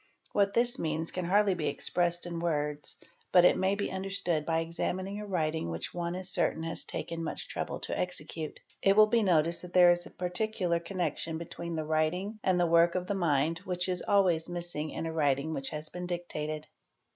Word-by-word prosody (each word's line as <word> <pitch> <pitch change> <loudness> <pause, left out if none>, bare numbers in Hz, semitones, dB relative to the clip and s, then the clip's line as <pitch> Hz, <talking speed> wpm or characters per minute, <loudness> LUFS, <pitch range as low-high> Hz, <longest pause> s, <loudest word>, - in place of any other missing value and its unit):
What 200 -1 +2
this 240 +2 +3
means 160 0 -1
can 180 -1 -3
he - - -4
dly 205 0 +4
be 165 -4 -2
expressed 175 0 0
in 170 -1 -4
words 150 -3 -2 0.4
but 180 -1 +7
it - - +6
may 190 +1 +1
be 200 - -2
understood 190 -5 -2
by 165 -1 +2
examining 185 +4 -2
a 210 - -6
writing 160 - -1
which 80 0 -4
one 175 0 -2
is 185 0 -3
certain 160 -3 +1
has 165 0 -3
taken 165 0 -5
much 160 - -4
trouble - - -4
to - - -3
execute. 160 -3 -4 0.2
It 195 +1 +4
will 215 - +9
be 230 +2 +2
noticed 170 -4 +2
that 180 0 -10
there 180 -1 +8
is 175 0 0
a - - -11
particular 180 -1 -1
connection 170 -2 -3
between 170 0 -6
the 155 -1 -2
writing 170 +7 0
and 185 -1 +2
the 175 - +4
work 170 +1 +4
of 180 -1 -1
the 200 - -1
mind 165 -3 +1
which 180 0 -2
is 180 -1 -1
always 180 -5 +2
missing 175 -3 -4
in 165 - -4
a 165 - -3
writing 145 0 +1
which 135 -3 -3
has 155 0 -5
een 180 0 -5
dictated. 155 -3 -4
175 Hz, 205 wpm, -30 LUFS, 160-185 Hz, 0.4 s, will